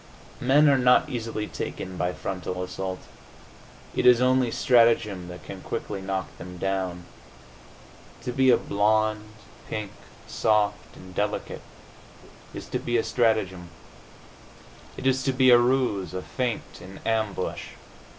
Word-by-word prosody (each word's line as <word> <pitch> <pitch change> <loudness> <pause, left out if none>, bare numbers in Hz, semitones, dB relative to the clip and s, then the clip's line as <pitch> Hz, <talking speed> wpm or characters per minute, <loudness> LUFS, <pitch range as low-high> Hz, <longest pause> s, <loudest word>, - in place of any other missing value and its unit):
Men 145 +4 +4
are 140 -2 +5
not 125 +4 +4
easily 115 -3 -3
taken 95 -2 -6
by 90 0 -1
frontal 90 0 -4
assault; 95 0 -5 0.9
it - - +1
is 125 -1 +7
only 130 -1 +3
strategem 115 -7 +3
that 90 0 -10
can - - -9
quickly 100 -2 -5
knock 95 0 -4
them 90 0 -9
down. 95 -2 -2 1.2
To 125 - -3
be 130 +1 +3
a 125 - +6
blonde, 105 +1 0 0.3
pink, 105 -2 -4 0.4
soft 105 -1 0
and 95 0 -12
delicate, 105 +2 -3 0.9
is - - -8
to - - -2
be 120 0 0
a 115 - +1
strategem. 110 -7 0 1.3
It - - -7
is 130 0 +2
to 135 0 0
be 130 -1 +5
a 120 - +8
ruse, 120 -7 +1
a 90 - -4
feint, 125 -3 -4
an 95 +2 -11
ambush. 110 -4 -2
110 Hz, 135 wpm, -26 LUFS, 95-125 Hz, 1.3 s, a